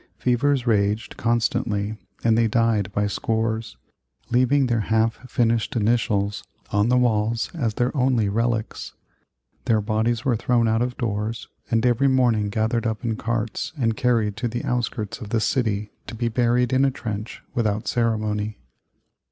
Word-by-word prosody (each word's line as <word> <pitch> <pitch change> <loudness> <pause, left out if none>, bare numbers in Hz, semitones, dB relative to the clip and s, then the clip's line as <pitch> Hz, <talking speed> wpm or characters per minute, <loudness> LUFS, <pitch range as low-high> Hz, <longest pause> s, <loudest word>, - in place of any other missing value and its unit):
Fevers 125 +1 +1
raged 105 -1 +1
constantly 115 -3 0 0.3
and 115 -1 +4
they 115 0 +3
died 110 -3 +1
by 105 +1 0
scores, 110 +1 -2 0.5
leaving 130 +3 +3
their 120 -2 +1
half 110 +3 0
finished 115 -1 +1
initials 105 -3 +1 0.3
on 105 +2 +2
the 125 - +4
walls 115 -2 +1
as 120 -10 -2
their 125 +4 0
only 125 -5 +2
relics. 115 +1 -2 0.7
Their 110 -2 +3
bodies 110 +4 0
were 130 -3 +3
thrown 120 +1 +2
out 110 +1 +2
of 125 0 -2
doors, 110 -2 -3 0.2
and 115 +1 +2
every 125 +3 +3
morning 120 -6 +2
gathered 115 +3 0
up 110 +2 -3
in 115 -1 0
carts 115 +3 -3
and 115 -4 +1
carried 115 -4 +1
to 120 - -1
the 120 +1 -4
outskirts 120 -3 -2
of 105 - -7
the 115 - +1
city 105 -4 0 0.2
to - - -6
be 115 +1 -1
buried 120 +1 +1
in 130 +1 +4
a 140 - +4
trench 110 -4 -6
without 110 -2 -1
ceremony. 110 -2 0
115 Hz, 155 wpm, -23 LUFS, 110-120 Hz, 0.7 s, and